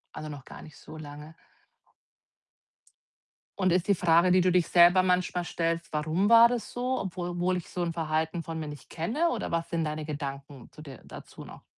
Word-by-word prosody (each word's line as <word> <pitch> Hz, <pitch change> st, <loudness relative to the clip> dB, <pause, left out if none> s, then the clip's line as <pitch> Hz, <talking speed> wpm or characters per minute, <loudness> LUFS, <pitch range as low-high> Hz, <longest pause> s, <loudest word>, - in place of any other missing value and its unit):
Also, 155 Hz, -, -6 dB
noch 140 Hz, -3 st, -9 dB
gar -, -, -11 dB
nicht 155 Hz, -, -14 dB
so -, -, -12 dB
lange. 150 Hz, +1 st, -10 dB, 2.2 s
Und 185 Hz, -2 st, +2 dB
ist 180 Hz, +3 st, +1 dB
die 200 Hz, -, +4 dB
Frage, 170 Hz, +1 st, +3 dB
die 185 Hz, -, +5 dB
du 180 Hz, 0 st, +2 dB
dich 180 Hz, -2 st, +2 dB
selber 175 Hz, +1 st, +6 dB
manchmal 180 Hz, -1 st, 0 dB
stellst: 165 Hz, 0 st, -2 dB
„Warum 160 Hz, +7 st, 0 dB
war 230 Hz, 0 st, +8 dB
das 245 Hz, -2 st, -4 dB
so? 250 Hz, +1 st, -1 dB
Obwohl 175 Hz, -2 st, -5 dB
wohl 185 Hz, +1 st, +1 dB
ich 175 Hz, -, -8 dB
so 180 Hz, -, -4 dB
'n 170 Hz, -1 st, -2 dB
Verhalten 160 Hz, +1 st, -2 dB
von 165 Hz, -1 st, -6 dB
mir 155 Hz, -, -5 dB
nicht 145 Hz, -2 st, -10 dB
kenne“, 245 Hz, -, -1 dB
oder -, -, -3 dB
was 165 Hz, 0 st, -2 dB
sind 165 Hz, -2 st, -1 dB
deine 155 Hz, 0 st, -4 dB
Gedanken 140 Hz, -3 st, -7 dB
zu -, -, -13 dB
der 140 Hz, -5 st, -11 dB
dazu -, -, -11 dB
noch? -, -, -13 dB
170 Hz, 200 wpm, -28 LUFS, 155-185 Hz, 2.2 s, war